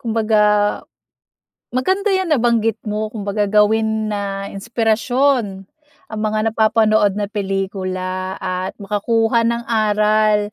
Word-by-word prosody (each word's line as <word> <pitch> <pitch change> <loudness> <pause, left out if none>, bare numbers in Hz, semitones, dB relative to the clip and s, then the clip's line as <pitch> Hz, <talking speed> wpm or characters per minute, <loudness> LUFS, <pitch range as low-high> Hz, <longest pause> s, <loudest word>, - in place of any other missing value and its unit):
Kumbaga, 220 -3 +1 1.3
maganda 380 - 0
'yang 375 -1 0
nabanggit 230 -6 +2
mo. 215 0 -2
Kumbaga, 205 -1 -2
gawin 215 +1 +2
na 200 -1 -4
inspirasyon, 225 0 0 0.5
ang 215 - -4
mga 215 +1 0
napapanood 215 -2 +2
na 210 - -1
pelikula 190 -2 -3
at 185 0 -4
makakuha 225 +3 0
ng 235 0 -2
aral. 215 -1 +2
215 Hz, 105 wpm, -19 LUFS, 200-225 Hz, 1.3 s, nabanggit